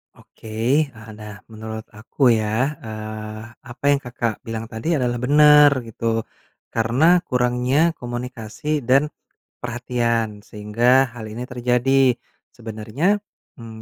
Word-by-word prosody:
Oke, -, -, -16 dB, 0.4 s
eee, 110 Hz, -4 st, -14 dB
nah, 105 Hz, -1 st, -10 dB
menurut 110 Hz, 0 st, -7 dB
aku 120 Hz, +4 st, +1 dB
ya, 115 Hz, +6 st, 0 dB
eee, 110 Hz, -2 st, -7 dB, 0.2 s
apa 120 Hz, +2 st, -13 dB
yang 140 Hz, -, +3 dB
Kakak 120 Hz, -4 st, -3 dB
bilang 115 Hz, -1 st, -4 dB
tadi 120 Hz, +10 st, -1 dB
adalah 120 Hz, -3 st, 0 dB
bener 150 Hz, +3 st, +7 dB
gitu. 115 Hz, 0 st, -2 dB, 0.5 s
Karena 130 Hz, +11 st, +3 dB
kurangnya 125 Hz, +5 st, +2 dB
komunikasi 120 Hz, +4 st, -4 dB
dan 140 Hz, +4 st, +4 dB, 0.5 s
perhatian, 115 Hz, -3 st, -1 dB
sehingga 120 Hz, +5 st, +2 dB
hal 115 Hz, -2 st, -8 dB
ini 110 Hz, +3 st, -6 dB
terjadi. 125 Hz, +1 st, +2 dB, 0.4 s
Sebenernya, 115 Hz, -, -1 dB, 0.4 s
mmm, 110 Hz, -1 st, -10 dB
120 Hz, 115 wpm, -22 LUFS, 110-130 Hz, 0.5 s, bener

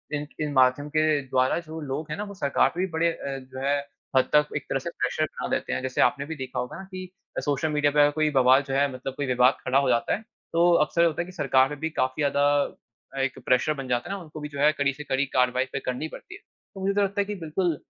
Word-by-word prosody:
इन 150 Hz, 0 st, -4 dB
इन 150 Hz, -1 st, -1 dB
माध्यम 130 Hz, +2 st, +3 dB
के 155 Hz, +1 st, +2 dB, 0.2 s
द्वारा 130 Hz, 0 st, +2 dB
जो 160 Hz, -1 st, -8 dB
लोग 150 Hz, +2 st, -4 dB
हैं -, -, -3 dB
ना, 205 Hz, -, -3 dB
वो 200 Hz, -1 st, -8 dB
सरकार 140 Hz, -8 st, +2 dB
पे -, -, -4 dB
भी 190 Hz, -, +1 dB
बड़े 165 Hz, +1 st, +2 dB
अ, 140 Hz, -4 st, -5 dB
जो 130 Hz, 0 st, -10 dB
है, 140 Hz, +1 st, +2 dB, 0.4 s
हद 130 Hz, -, +3 dB
तक 150 Hz, 0 st, +5 dB
एक -, -, -2 dB
तरह -, -, 0 dB
से -, -, -5 dB
प्रेशर -, -, -1 dB
बना -, -, -6 dB
देते -, -, -1 dB
हैं। -, -, -1 dB
जैसे 130 Hz, 0 st, -1 dB
आपने 140 Hz, +3 st, +2 dB
भी 160 Hz, +2 st, -5 dB
देखा 130 Hz, -4 st, -5 dB
होगा 125 Hz, 0 st, -4 dB
ना 190 Hz, -, -8 dB
कि 185 Hz, -1 st, -7 dB, 0.4 s
सोशल 145 Hz, +1 st, 0 dB
मीडिया 145 Hz, -1 st, +2 dB
पे 150 Hz, -, +1 dB
अगर 145 Hz, 0 st, +5 dB
कोई 155 Hz, +1 st, +1 dB
बवाल 130 Hz, +1 st, +6 dB
जो 135 Hz, -, -3 dB
है, 140 Hz, +1 st, +3 dB
मतलब 130 Hz, +1 st, -5 dB
कोई 145 Hz, -, -1 dB
विवाद 125 Hz, +1 st, +4 dB
खड़ा 130 Hz, +1 st, +2 dB
हो 140 Hz, -2 st, +1 dB
जाता 115 Hz, -1 st, +2 dB
है, -, -, -8 dB
तो 175 Hz, -6 st, 0 dB
अक्सर 170 Hz, +2 st, +2 dB
होता 165 Hz, +1 st, 0 dB
है -, -, -3 dB
कि 185 Hz, -, -11 dB
सरकार 135 Hz, -6 st, +3 dB
में 145 Hz, -1 st, -7 dB
भी 160 Hz, +2 st, -2 dB
काफ़ी 130 Hz, -2 st, -1 dB
ज़्यादा 140 Hz, 0 st, +2 dB, 0.8 s
एक 135 Hz, -, -2 dB
प्रेशर 130 Hz, +4 st, +3 dB
बन 135 Hz, -3 st, -6 dB
जाता 120 Hz, -1 st, -1 dB
है 200 Hz, -, -2 dB
ना, 195 Hz, -, -7 dB
उनको 155 Hz, -1 st, -10 dB
भी 150 Hz, 0 st, -6 dB
जो 140 Hz, -, -8 dB
है, 150 Hz, +1 st, +6 dB
कड़ी 140 Hz, -2 st, 0 dB
से 150 Hz, -, -8 dB
कड़ी 135 Hz, -1 st, 0 dB
कार्यवाही 125 Hz, 0 st, +3 dB
फिर 135 Hz, -, -3 dB
करनी 125 Hz, +5 st, -2 dB
पड़ती 360 Hz, -, -11 dB
है। -, -, -14 dB, 0.3 s
तो 195 Hz, -, -9 dB
मुझे 195 Hz, +1 st, +1 dB
तो 205 Hz, -, +2 dB
लगता 200 Hz, +1 st, 0 dB
है -, -, -1 dB
कि 210 Hz, +1 st, -4 dB
बिल्कुल 165 Hz, 0 st, 0 dB
145 Hz, 280 wpm, -26 LUFS, 130-160 Hz, 0.8 s, बवाल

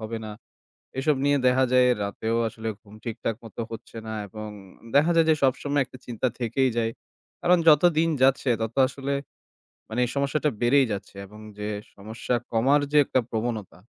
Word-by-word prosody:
হবে 110 Hz, +1 st, -4 dB
না। 110 Hz, -, -6 dB, 0.7 s
এসব 145 Hz, +2 st, +2 dB
নিয়ে 145 Hz, 0 st, +3 dB
দেখা 130 Hz, +1 st, +4 dB
যায় 125 Hz, 0 st, +6 dB, 0.2 s
রাতেও 110 Hz, +3 st, -2 dB
আসলে 110 Hz, 0 st, -6 dB
ঘুম 105 Hz, -2 st, -17 dB
ঠিকঠাক 115 Hz, -1 st, -3 dB
মতো 115 Hz, 0 st, -8 dB
হচ্ছে 115 Hz, 0 st, -9 dB
না 110 Hz, -, -5 dB, 0.2 s
এবং 110 Hz, +2 st, -7 dB, 0.5 s
দেখা 150 Hz, +4 st, +5 dB
যায় 165 Hz, -1 st, +5 dB
যে -, -, +6 dB
সবসময় 140 Hz, +2 st, +2 dB
একটা 130 Hz, -, -14 dB
চিন্তা 120 Hz, +1 st, -2 dB
থেকেই 125 Hz, +3 st, +1 dB
যায়। 115 Hz, -1 st, +1 dB, 0.5 s
কারণ 180 Hz, 0 st, +5 dB
যত 150 Hz, -2 st, +7 dB, 0.2 s
দিন 165 Hz, +1 st, +3 dB
যাচ্ছে 135 Hz, 0 st, +3 dB
তত 110 Hz, +1 st, -3 dB
আসলে 140 Hz, +1 st, -3 dB, 0.7 s
মানে 110 Hz, +3 st, -2 dB
এই -, -, -6 dB
সমস্যাটা 140 Hz, +2 st, +1 dB
বেড়েই 130 Hz, +3 st, +4 dB
যাচ্ছে, 100 Hz, 0 st, -7 dB
এবং 105 Hz, +2 st, -14 dB, 0.2 s
যে 105 Hz, 0 st, -3 dB, 0.3 s
সমস্যা 110 Hz, +4 st, -4 dB, 0.2 s
কমার 130 Hz, +6 st, +4 dB
যে 150 Hz, -, +6 dB
একটা 130 Hz, -, +1 dB
প্রবণতা 110 Hz, -5 st, -3 dB
120 Hz, 170 wpm, -25 LUFS, 110-140 Hz, 0.7 s, যত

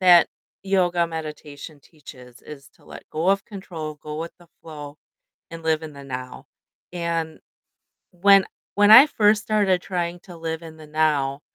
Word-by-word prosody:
that 175 Hz, -2 st, +6 dB, 0.3 s
yoga 180 Hz, -3 st, +1 dB
meditation 155 Hz, -2 st, -8 dB
teaches, 125 Hz, -5 st, -15 dB
is 140 Hz, -2 st, -12 dB
to -, -, -25 dB
let -, -, -12 dB
go 160 Hz, +4 st, -1 dB
of 195 Hz, 0 st, +1 dB
control, 165 Hz, -7 st, -8 dB
go 150 Hz, 0 st, -6 dB
with 165 Hz, +1 st, -6 dB
the 175 Hz, -1 st, -20 dB
flow, 150 Hz, -2 st, -9 dB, 0.5 s
and 165 Hz, 0 st, -9 dB
live 160 Hz, 0 st, 0 dB
in 155 Hz, -1 st, -8 dB
the 140 Hz, 0 st, -11 dB
now, 125 Hz, -1 st, -7 dB, 0.5 s
and 165 Hz, -2 st, -3 dB, 0.7 s
when 195 Hz, +2 st, +5 dB, 0.3 s
when 205 Hz, 0 st, +4 dB
I 245 Hz, +7 st, +11 dB
first 210 Hz, -6 st, +2 dB
started 200 Hz, -4 st, +1 dB
trying 175 Hz, -1 st, -3 dB
to 175 Hz, -1 st, -13 dB
live 160 Hz, 0 st, -5 dB
in 160 Hz, -1 st, -11 dB
the 155 Hz, -1 st, -13 dB
now, 150 Hz, -3 st, 0 dB
165 Hz, 160 wpm, -23 LUFS, 150-180 Hz, 0.7 s, I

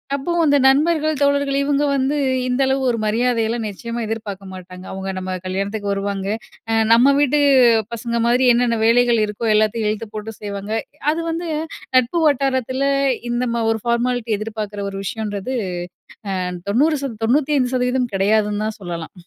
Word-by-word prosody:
அப்போ 280 Hz, +5 st, -3 dB
அந்த 285 Hz, -2 st, +4 dB
நண்பர்கள் 310 Hz, +2 st, +3 dB
தோழர்கள் 280 Hz, -1 st, +2 dB
இவுங்க 290 Hz, +1 st, +1 dB
வந்து 275 Hz, +2 st, 0 dB, 0.3 s
இந்த 250 Hz, +2 st, 0 dB
அளவு 265 Hz, 0 st, +1 dB
ஒரு 235 Hz, -, 0 dB
மரியாதயெல்லாம் 230 Hz, 0 st, 0 dB
நிச்சயமா 230 Hz, +4 st, -6 dB
எதிர்பாக்க 210 Hz, -3 st, -5 dB
மாட்டாங்க. 185 Hz, 0 st, -10 dB
அவுங்க 190 Hz, 0 st, -5 dB
நம்ம 185 Hz, 0 st, -4 dB
கல்யாணத்துக்கு 200 Hz, +2 st, -2 dB
வருவாங்க, 195 Hz, -1 st, -2 dB, 0.7 s
நம்ம 255 Hz, +4 st, +5 dB
வீட்டு 290 Hz, 0 st, +3 dB, 0.5 s
பசங்க 235 Hz, +1 st, -2 dB
மாதிரி 245 Hz, +2 st, +3 dB
என்னென்ன 235 Hz, -1 st, +1 dB
வேலைகள் 235 Hz, 0 st, +4 dB
இருக்கோ 210 Hz, +2 st, -4 dB
எல்லாத்தயும் 215 Hz, 0 st, +1 dB
இழுத்து 215 Hz, +1 st, -3 dB
போட்டு 215 Hz, +1 st, -5 dB
செய்வாங்க. 200 Hz, 0 st, -5 dB, 0.4 s
அது 320 Hz, -, -2 dB
வந்து 335 Hz, 0 st, -4 dB, 0.5 s
நட்பு 255 Hz, +8 st, +2 dB
வட்டாரத்துல 270 Hz, -1 st, 0 dB, 0.4 s
இந்த 240 Hz, +1 st, 0 dB
ம 230 Hz, -, 0 dB
ஒரு 220 Hz, -2 st, -2 dB
ஃபார்மாலிட்டி 235 Hz, -1 st, 0 dB
எதிர்பாக்குற 210 Hz, -2 st, -5 dB
ஒரு 195 Hz, -, -6 dB
விஷயம்ன்றது 215 Hz, +4 st, -4 dB, 0.8 s
அ -, -, -1 dB, 0.3 s
90% 275 Hz, -1 st, 0 dB
95% 255 Hz, -2 st, +1 dB
கெடயாதுன்னு 210 Hz, +1 st, +1 dB
தா -, -, 0 dB
சொல்லலாம். 170 Hz, -2 st, -6 dB
235 Hz, 140 wpm, -20 LUFS, 210-265 Hz, 0.8 s, நம்ம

